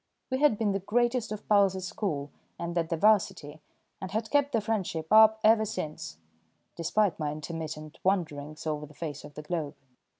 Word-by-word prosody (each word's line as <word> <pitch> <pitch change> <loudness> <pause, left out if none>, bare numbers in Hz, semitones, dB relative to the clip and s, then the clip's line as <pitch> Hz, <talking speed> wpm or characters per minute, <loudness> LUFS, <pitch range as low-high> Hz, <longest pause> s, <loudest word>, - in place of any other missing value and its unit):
We 260 - 0
had 290 -7 +4
been 210 -2 +1
the 195 - 0
greatest 240 +3 0
of 215 - -6
pals 200 -2 +4
at 190 - -5
school 155 -7 -3 0.3
and 170 0 -4
at 165 -1 0
the 165 - -1
'Varsity, 160 -7 +2 0.4
and 190 - -4
had 220 +3 -3
kept 285 -1 +3
the 230 - +2
friendship 200 -6 -2
up 220 0 +7
ever 220 0 +5
since, 150 - -5 0.6
despite 180 +2 +1
my 150 -1 -1
intermittent 155 0 -6
wanderings 155 -6 -1
over 150 -1 -3
the 150 - -17
face 150 -3 -6
of 145 -1 -12
the 150 - -7
globe. 150 -3 -3
180 Hz, 180 wpm, -29 LUFS, 155-215 Hz, 0.6 s, up